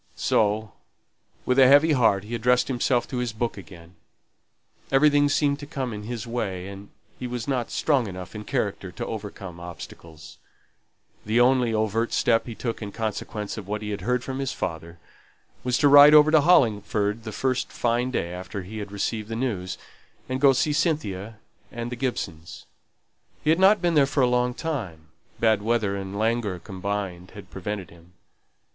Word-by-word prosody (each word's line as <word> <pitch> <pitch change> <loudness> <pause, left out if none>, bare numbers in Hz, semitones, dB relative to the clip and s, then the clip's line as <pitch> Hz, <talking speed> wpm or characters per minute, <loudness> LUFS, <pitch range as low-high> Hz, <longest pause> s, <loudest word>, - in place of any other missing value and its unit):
So 105 0 +1 0.7
with 125 +1 +2
a 130 - +8
heavy 145 +4 +6
heart 115 -8 +3
he 110 +3 -8
addressed 125 +3 +2
himself 125 -1 +1
to 130 - -4
his 125 -2 -1
book 115 +1 -2
again. 85 -3 -13 1.0
Everything 145 +1 +4
seemed 145 0 +1
to 145 - -8
come 135 -6 -4
in 105 0 -7
his 115 -1 -5
way, 100 -6 -3
and 100 +1 -10 0.3
he 125 - -4
was 120 -2 -5
not 125 -4 -1
strong 135 -7 +1
enough 90 -1 -8
in 105 -1 -7
character - - -3
to - - -5
overcome 90 -3 -7
obstacles. 85 -2 -11 0.8
The 110 +3 +1
only 125 -1 +4
overt 110 +1 0
step 115 0 +2
he 115 - -6
took 115 0 -4
in 105 -2 -5
consequence 105 0 -4
of 100 - -10
what 105 +1 -3
he 105 - -4
had 100 - -4
heard 125 +4 0
from 130 0 -5
his 135 -2 -2
father, 85 +1 -5 0.7
was 125 -1 +1
to 145 - +4
ride 145 +1 +9
over 150 0 +7
to 155 -1 +6
Hollingford 110 - +2
the 110 - -6
first 130 +3 -1
fine 120 +1 0
day 85 -9 -2
after 95 +2 -6
he 110 +4 -7
had 100 -1 -7
received 105 +1 -3
the 115 - -3
news, 105 -7 -3 0.5
and 130 +1 -3
go 140 - +7
to - - 0
see 150 - +1
Cynthia 115 - -1 0.3
and 120 0 -5
the - - -3
Gibsons. 95 - -5 0.8
He 155 - +3
had 165 - +2
not 195 +1 +5
been 175 -1 +2
there 145 -3 +4
for 140 0 0
a - - +4
long 125 0 +1
time; 100 - -5 0.3
bad 110 -2 +3
weather 110 -2 0
and 95 0 -5
languor 110 -3 0
combined 95 -1 -5
had 100 - -11
prevented 95 -1 -5
him. 85 +1 -19
115 Hz, 180 wpm, -25 LUFS, 100-130 Hz, 1.0 s, ride